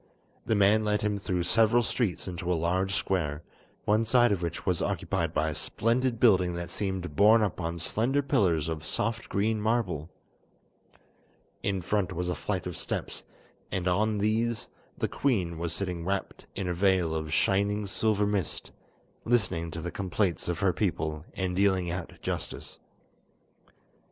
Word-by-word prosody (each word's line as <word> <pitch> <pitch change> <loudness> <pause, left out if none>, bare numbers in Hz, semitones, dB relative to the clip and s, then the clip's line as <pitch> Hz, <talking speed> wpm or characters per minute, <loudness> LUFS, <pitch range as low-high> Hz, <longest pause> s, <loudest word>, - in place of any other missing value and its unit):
The 110 - +3
man 105 +2 +4
led 105 0 0
him 105 -1 0
through 90 -3 -1
several 115 +6 +4
streets 110 -5 -1
into 90 0 -3
a - - +3
large 95 +4 0
square, 80 -5 -1 0.4
one 110 +2 +3
side 120 +1 +4
of 100 -3 0
which 85 -2 -4
was - - +1
occupied 85 -2 -1
by 80 -1 +1
a - - -3
splendid 115 - 0
building 90 -7 +4
that 85 0 -5
seemed 95 -6 -3
borne 110 +5 +6
up 95 -3 -2
on 85 0 -2
slender 120 - +1
pillars 95 - +2
of 80 -2 -3
soft 115 +8 -2
green 105 +2 0
marble. 105 -9 0 1.5
In 95 -2 -1
front 95 0 0
was 90 +1 -2
a - - +1
flight 95 0 -3
of 90 -2 -4
steps, - - -4 0.5
and 95 -1 -1
on 105 +4 +2
these 110 +3 0 0.3
the - - 0
queen 90 -12 0
was 85 -1 -2
sitting 90 -1 -3
wrapped 95 +2 -3
in 95 -2 -3
a 90 - 0
veil 90 -2 +2
of 80 -1 -3
shining 100 +5 +2
silver 105 +1 +1
mist, 100 -5 -2 0.5
listening 95 -8 +1
to 80 0 -6
the 85 - -4
complaints 95 -2 -1
of 85 -1 -1
her 95 -3 +3
people 80 -6 -2
and 95 -2 -1
dealing 95 -3 +2
out 90 -1 -4
justice. - - -4
95 Hz, 160 wpm, -28 LUFS, 85-105 Hz, 1.5 s, borne